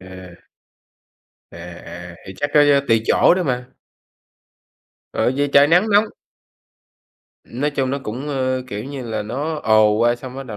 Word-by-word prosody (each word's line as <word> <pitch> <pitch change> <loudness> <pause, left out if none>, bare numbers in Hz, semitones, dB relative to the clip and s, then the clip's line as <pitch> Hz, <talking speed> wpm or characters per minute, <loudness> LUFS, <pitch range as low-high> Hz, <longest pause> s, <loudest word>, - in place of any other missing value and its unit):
À. 95 -1 -12 1.2
À, 85 - -11
à, 85 0 -10
thì 95 - -8
chắc 145 - -3
có 150 - +7 0.3
tùy 115 -1 +3
chỗ - - +4
đó 185 - -1
mà. 125 -4 -3 1.4
Ừ, - - 0
vì 145 0 +1
trời 140 +1 +6
nắng 180 +7 +3
nóng 205 +1 +5 1.4
Nói 145 +5 -3
chung 135 -2 -2
nó 140 - -2
cũng, 130 +7 -6
ơ, 130 -2 -1
kiểu 105 -1 -6
như 140 -1 -7
là, 110 -2 -3
nó 140 +9 -4
ồ 110 -1 +4
qua 120 +1 +2
xong 125 +1 -10
bắt 135 - -5
đầu 110 -4 -7
125 Hz, 165 wpm, -20 LUFS, 105-140 Hz, 1.4 s, có